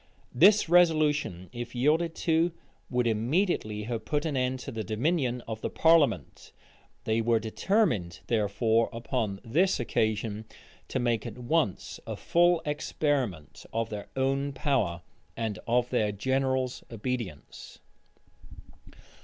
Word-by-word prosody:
This 200 +10 +6
resolution, 155 - +3
if 120 +1 -6
yielded 160 +6 +2
to, 165 +1 +1 0.4
would 125 -1 +1
immediately 115 - 0
have 115 0 -4
put 145 +8 -1
an 155 -3 -1
end 130 0 0
to 135 - -6
the 110 -3 -4
dominion 125 - 0
of 110 -1 -7
the - - -2
parliament: 145 - +2 0.5
they 110 +1 +1
were 115 0 +3
determined, 110 - 0
therefore, 110 +1 +1
upon 115 -4 -3
this 170 +11 +2
occasion, 110 -2 -1 0.4
to - - -3
make 120 -2 0
at 115 - -8
once 125 - -1
a - - -3
full 175 -1 +3
experiment 140 - -2
of 115 0 -2
their 105 -1 -5
own 135 +1 0
power, 125 - 0 0.3
and 110 -3 -3
of 120 +1 +1
their 110 -4 +1
general's 130 +3 -1
obedience. 115 - -6
125 Hz, 125 wpm, -28 LUFS, 110-150 Hz, 0.5 s, This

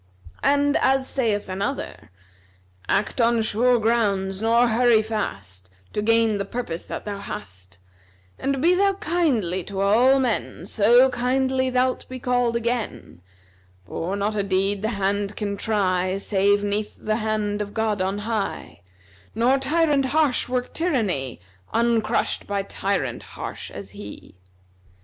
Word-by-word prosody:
And 285 0 +3
as 265 0 +2
saith 220 -6 0
another,[FN#259] 195 +8 -4 0.8
'Act 215 - +1
on 230 0 +3
sure 245 +3 +3
grounds, 200 -4 0
nor 230 +2 +4
hurry 230 -1 +4
fast, 100 - -5 0.2
To 210 - -1
gain 225 -1 +2
the - - 0
purpose 195 -6 -5
that - - -6
thou 205 -1 -4
hast 90 - -9 0.6
And 275 0 -1
be 345 +2 +5
thou 395 +2 +3
kindly 260 - 0
to 195 -1 -5
all 240 +7 +4
men 235 -8 -2
So 240 +6 +5
kindly 260 +1 +1
thou'lt 255 0 0
be 255 - -6
called 245 -1 0
again; 230 - -3 0.6
For 180 - -3
not 205 +2 -1
a 205 - +1
deed 195 +1 0
the 220 - 0
hand 200 +1 -1
can 205 -2 -3
try, 185 -3 0
Save 200 0 +2
'neath 205 +1 -2
the 215 0 -1
hand 215 -2 -1
of 205 0 -6
God 220 -3 0
on 190 +2 -1
high, 220 - -3 0.5
Nor 250 +4 +3
tyrant 295 0 +2
harsh 280 -3 +1
work 250 0 -2
tyranny, 210 - -1 0.4
Uncrushed 230 -1 +1
by 200 -1 -1
tyrant 195 -11 -2 0.2
harsh - - -6
as 100 -1 -9
he.' 100 0 -10
215 Hz, 140 wpm, -23 LUFS, 195-250 Hz, 0.8 s, be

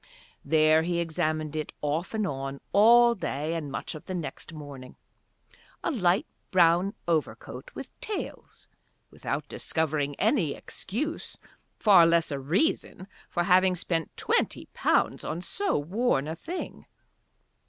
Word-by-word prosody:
There 155 0 +4
he 170 +1 -1
examined 155 -2 -1
it, 155 -1 -3
off 155 +8 -2
and 215 -1 0
on, 135 -2 -4
all 235 +3 +7
day 155 -6 -3
and 155 -4 -4
much - - -4
of 155 - -10
the 185 - -4
next 170 0 -5
morning, 145 -5 -10 0.9
a - - 0
light 185 - +2 0.2
brown 180 +2 +4
overcoat 165 - -2
with - - -7
tails, 425 - -6 0.4
without - - -4
discovering 150 -3 -1
any 200 - +1
excuse, 300 - -5 0.4
far 190 -6 +7
less 170 -1 +2
a 140 - -2
reason, 185 - 0 0.2
for 175 - 0
having 185 0 +4
spent 165 -2 -2
twenty - - 0
pounds - - +1
on 165 - -3
so 400 - -1
worn 160 - 0
a 160 - -3
thing. 345 - -7
170 Hz, 130 wpm, -28 LUFS, 155-195 Hz, 0.9 s, all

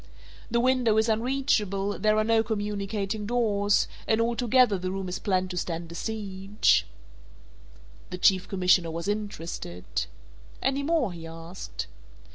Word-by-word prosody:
The 235 +1 +2
window 250 -3 +3
is 220 +1 +3
unreachable, 215 -5 0
there 215 0 +3
are 215 - +3
no 225 0 +3
communicating 210 -1 -2
doors, 210 -4 +2 0.2
and 220 - +3
altogether 235 -2 +3
the 185 +1 -3
room 190 0 -3
is 180 - -3
planned 185 -2 0
to 180 - -5
stand 170 -1 -3
a - - -7
siege." 195 - +1 1.2
The 180 - -5
Chief 185 0 +4
Commissioner 180 -3 +3
was 165 +3 -4
interested. 175 - -4 0.7
"Any 270 +2 0
more?" 285 - +1
he 165 -1 -8
asked. 165 - -7
205 Hz, 135 wpm, -27 LUFS, 185-225 Hz, 1.2 s, Chief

